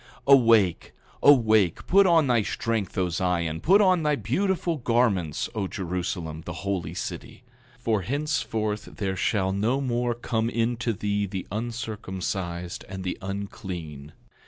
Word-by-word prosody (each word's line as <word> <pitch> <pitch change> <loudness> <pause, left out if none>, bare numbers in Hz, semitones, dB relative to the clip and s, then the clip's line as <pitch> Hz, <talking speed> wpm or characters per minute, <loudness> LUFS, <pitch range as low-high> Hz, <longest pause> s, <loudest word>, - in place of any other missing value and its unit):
8:24 140 - +8
Awake, 115 -9 +4 0.3
awake, 110 - +4
put 195 +1 +5
on 165 -3 +5
thy 120 -3 +3
strength, 110 -1 -2
O 90 -2 +1
Zion; 85 -2 -1
put 195 +4 +5
on 185 -3 +4
thy 150 -1 +2
beautiful 170 - -1
garments, 115 - +1
O 105 -5 -2
Jerusalem, 85 -4 -4
the 85 +3 -7
holy 95 -4 -2
city; - - -6 0.3
for 115 -4 0
henceforth 115 - -2
there 95 -2 -2
shall 95 -1 0
no 110 +7 +1
more 120 -2 -1
come 115 -1 -1
into 120 0 0
thee 105 0 -1
the 95 -1 -5
uncircumcised 95 -6 -4
and 95 0 -6
the 90 - -2
unclean. 90 -7 -6
105 Hz, 135 wpm, -26 LUFS, 95-120 Hz, 0.3 s, 8:24